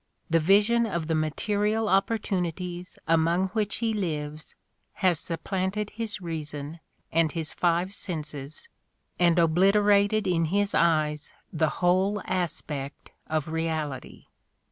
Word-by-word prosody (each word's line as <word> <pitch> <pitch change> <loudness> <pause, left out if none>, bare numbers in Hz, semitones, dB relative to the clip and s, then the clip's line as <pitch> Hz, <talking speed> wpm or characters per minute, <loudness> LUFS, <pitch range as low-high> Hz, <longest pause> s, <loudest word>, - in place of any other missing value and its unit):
The 165 - +5
vision 210 +7 +4
of 170 -6 -2
the 160 - -1
material 205 +8 0
opportunities 180 -3 -1
among 165 +3 +2
which 210 -1 -1
he 225 -1 0
lives 155 -6 -4 0.4
has 180 -4 +1
supplanted 190 +5 -3
his 220 -2 -4
reason 155 -2 -6 0.3
and 165 -1 +3
his 160 -2 -4
five 175 +2 +1
senses 150 -6 -6 0.5
and 175 -1 +4
obliterated 200 +5 +4
in 170 -3 +2
his 200 +5 0
eyes 155 -2 +1 0.2
the 160 -1 +2
whole 190 +4 +3
aspect 150 -5 -4 0.2
of 155 -1 -1
reality. 160 -4 -3
175 Hz, 115 wpm, -27 LUFS, 160-200 Hz, 0.5 s, The